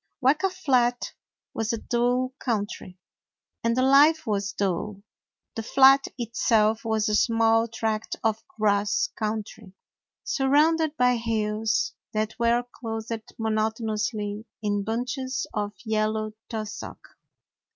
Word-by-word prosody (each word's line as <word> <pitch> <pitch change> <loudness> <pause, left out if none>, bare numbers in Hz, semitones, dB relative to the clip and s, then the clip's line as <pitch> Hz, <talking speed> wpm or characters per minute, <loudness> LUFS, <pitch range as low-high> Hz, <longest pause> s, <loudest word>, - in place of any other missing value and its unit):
Weka 300 +8 +3
Flat 250 -9 +1 0.4
was 225 0 -1
a 230 - -1
dull 245 +3 0
country, 205 -5 -3 0.7
and 230 +1 +1
the 255 - +3
life 295 +4 +5
was 200 -2 -1
dull. 200 +1 -2 0.5
The 225 - -4
flat 270 +4 +5
itself 225 -2 +1
was 220 -1 0
a 210 - 0
small 225 +1 +3
tract 220 -1 -2
of 225 0 0
grass 205 -5 +1
country, 215 -2 -4 0.5
surrounded 310 - +2
by 250 -1 +3
hills 220 -1 -1 0.2
that 215 0 -1
were 235 +1 +2 0.2
clothed 225 -1 -5
monotonously 220 -1 -2 0.2
in 205 -1 0
bunches 250 +4 -2
of 205 -1 -2
yellow 215 0 0 0.2
tus 220 -2 -4
sock. - - -9
225 Hz, 115 wpm, -26 LUFS, 215-250 Hz, 0.7 s, life